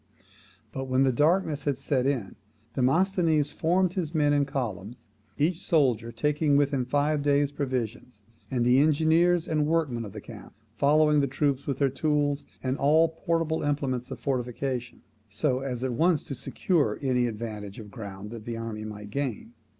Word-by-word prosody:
But, 135 0 -4
when 130 0 +2
the 135 - +3
darkness 150 +2 +1
had 140 -3 0
set 135 -1 0
in, 125 -9 -2 0.4
Demosthenes 160 +2 +2
formed 180 +2 +1
his 175 -4 -3
men 145 -1 +3
in 145 -1 +3
columns, 120 - -5 0.3
each 165 +4 +1
soldier 125 - +2
taking 150 +2 +1
with 145 -1 +2
him 130 -3 0
five 145 +3 +1
days' 145 0 +2
provisions, 125 -5 -4 0.3
and 125 -3 0
the 125 +2 +5
engineers 160 +4 +3
and 155 -2 +1
workmen 150 -8 0
of 100 -3 -8
the 105 - -6
camp 105 -1 -11 0.2
following 150 +3 +4
the 140 - +2
troops 140 0 -1
with 140 -3 -1
their 140 -1 +2
tools, 145 0 0 0.2
and 130 +1 -1
all 160 +4 +4
portable 165 0 -1
implements 135 -4 -1
of - - -7
fortification, 125 -1 -3 0.3
so 130 +5 0
as 130 -2 -4
at 130 -2 -1
once 165 +4 +2
to - - -6
secure 135 - 0
any 125 -2 +2
advantage 105 -3 -6
of 105 -3 -10
ground 100 -1 -8
that 115 -2 -8
the 115 -1 -4
army 115 -2 -5
might 105 -1 -8
gain. 125 -3 -3
140 Hz, 170 wpm, -27 LUFS, 120-150 Hz, 0.4 s, the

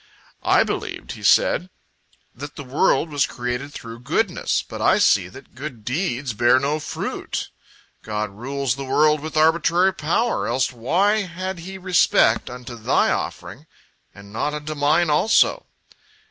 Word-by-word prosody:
"I - - +4
believed," - - -5
he - - -9
said, 185 - +3 0.6
"that 145 +4 -9
the 145 - -7
world 140 +4 +1
was 145 -2 +1
created 125 +3 -4
through 115 -3 -9
goodness, 125 - 0
but - - -7
I - - +4
see - - +3
that - - -14
good 125 -4 -8
deeds 135 - -2
bear 120 +3 +4
no 145 +3 -1
fruit. - - -5 0.5
God 105 -1 -3
rules 130 +4 -2
the 135 +2 -6
world 150 +3 +3
with 155 +1 -6
arbitrary 170 +4 +3
power, 190 +8 0
else 130 -1 0
why 175 - +1
had 185 0 -5
He 190 +3 -8
respect 180 -11 +3
unto 125 0 -8
thy 110 - +1
offering, - - -5 0.4
and 100 0 -14
not 150 +6 -2
unto 150 +1 -5
mine 155 +3 +2
also?" 220 - +3
145 Hz, 145 wpm, -22 LUFS, 125-170 Hz, 0.6 s, I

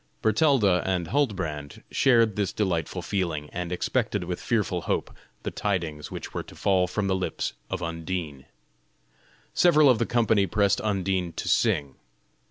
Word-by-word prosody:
Bertalda 110 - +3
and 90 -3 -1
Huldbrand 90 - -2
shared 115 -5 +4
this 100 -2 0
delightful 90 -7 -1
feeling, 85 -7 -2
and 90 0 -4
expected 105 +1 -1
with 90 0 -4
fearful 105 -7 0
hope - - -1 0.3
the - - -3
tidings 85 -8 -2
which - - -7
were - - -2
to - - -13
fall 95 -2 +2
from 100 +3 -2
the 95 - +1
lips 95 - -2 0.2
of 95 -2 -3
Undine. 85 -4 -4 1.1
Several 155 -4 +5
of 115 - +1
the 115 - 0
company 110 -4 +2
pressed 100 -1 +2
Undine 95 -4 -1
to - - -5
sing. 70 -2 +1
95 Hz, 150 wpm, -26 LUFS, 85-105 Hz, 1.1 s, Several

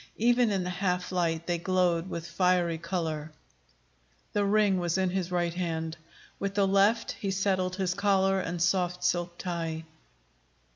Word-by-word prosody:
Even 240 +1 +3
in 195 -3 0
the 180 - -3
half 180 -1 -1
light, 165 -2 0
they 175 -1 -1
glowed 180 -1 +1
with 165 -1 -5
fiery 180 -3 +1
color. 160 -3 -3 1.0
The 205 - +2
ring 200 -2 +3
was 175 0 0
in 185 -1 +1
his 185 -1 -2
right 175 -1 0
hand. 165 -2 -3 0.4
With 200 0 -3
the 200 -1 +3
left 200 +4 +3
he 200 - -4
settled 190 -1 0
his 185 -2 0
collar 195 -1 +2
and 175 -1 -3
soft 180 +1 +1
silk 175 0 0
tie. 165 -3 -3
180 Hz, 155 wpm, -29 LUFS, 170-195 Hz, 1.0 s, Even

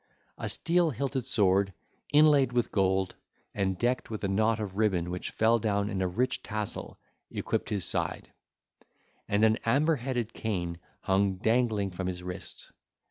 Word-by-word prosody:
A - - -3
steel 175 -1 +2
hilted 135 -1 -2
sword, 100 -4 +2 0.4
inlaid 145 -4 +5
with 120 -1 +1
gold, 95 -1 +1 0.4
and 95 -2 0
decked 120 +4 0
with 110 -2 -5
a - - +1
knot 110 +3 +2
of 100 -3 -4
ribbon 95 -5 +1
which 90 - -4
fell 115 +1 +3
down 100 -1 0
in 95 - -2
a 95 - +1
rich 120 +8 0
tassel, 105 -1 -5 0.3
equipped - - -2
his 100 -5 0
side; - - -1 1.0
and 105 +2 +3
an 110 +1 +3
amber 145 +7 +3
headed 120 -2 -3
cane 85 -6 -3 0.2
hung 95 0 +2
dangling 110 -1 +1
from 90 +1 -4
his 90 -1 -4
wrist. 90 0 -7
105 Hz, 155 wpm, -29 LUFS, 95-120 Hz, 1.0 s, inlaid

